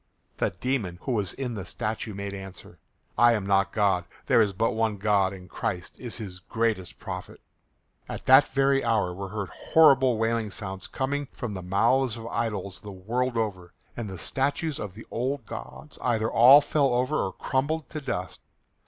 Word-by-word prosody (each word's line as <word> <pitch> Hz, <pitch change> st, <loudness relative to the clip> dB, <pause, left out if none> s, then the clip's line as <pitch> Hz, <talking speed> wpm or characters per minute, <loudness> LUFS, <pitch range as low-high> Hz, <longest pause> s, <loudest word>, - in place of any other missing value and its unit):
The -, -, +1 dB
demon 100 Hz, -2 st, -2 dB
who -, -, -2 dB
was 105 Hz, -6 st, -1 dB
in 130 Hz, -3 st, -4 dB
the 100 Hz, -4 st, -5 dB
statue 110 Hz, +2 st, -4 dB
made 100 Hz, 0 st, -5 dB
answer, 95 Hz, -2 st, -9 dB, 0.4 s
"I 120 Hz, 0 st, +7 dB
am 105 Hz, -4 st, -1 dB
not 100 Hz, 0 st, +2 dB
God. 100 Hz, -4 st, +2 dB, 0.2 s
There 115 Hz, -, +5 dB
is 105 Hz, -2 st, +2 dB
but 115 Hz, +4 st, 0 dB
one 110 Hz, -2 st, 0 dB
God 100 Hz, -2 st, +2 dB
and 95 Hz, -2 st, -10 dB
Christ 90 Hz, -1 st, -4 dB
is 120 Hz, -3 st, -4 dB
his 95 Hz, -5 st, -7 dB
greatest 110 Hz, -2 st, -2 dB
prophet." 90 Hz, -2 st, -7 dB, 0.7 s
At -, -, -6 dB
that -, -, +7 dB
very 135 Hz, 0 st, +2 dB
hour 110 Hz, -6 st, +1 dB
were 95 Hz, +1 st, -6 dB
heard 105 Hz, -1 st, -4 dB
horrible 135 Hz, -6 st, +4 dB
wailing 115 Hz, -1 st, 0 dB
sounds 95 Hz, -2 st, -5 dB
coming 140 Hz, +2 st, -2 dB
from 120 Hz, -4 st, -5 dB
the 95 Hz, -, -5 dB
mouths 115 Hz, +6 st, +2 dB
of 115 Hz, -, -8 dB
idols 105 Hz, -5 st, -3 dB
the 105 Hz, -, -9 dB
world 120 Hz, +6 st, -2 dB
over, 95 Hz, -6 st, -3 dB, 0.2 s
and 115 Hz, -4 st, -5 dB
the 95 Hz, -, -7 dB
statues 140 Hz, -, -1 dB
of 105 Hz, -3 st, -6 dB
the 110 Hz, -, -10 dB
old 130 Hz, +1 st, -2 dB
gods 150 Hz, +7 st, -9 dB
either 110 Hz, -2 st, 0 dB
all 130 Hz, +5 st, +8 dB
fell 140 Hz, -3 st, +1 dB
over 130 Hz, +5 st, +1 dB
or 95 Hz, -, -2 dB
crumbled 150 Hz, +4 st, -1 dB
to 155 Hz, -, -5 dB
dust. 140 Hz, -, -4 dB
110 Hz, 180 wpm, -27 LUFS, 95-130 Hz, 0.7 s, all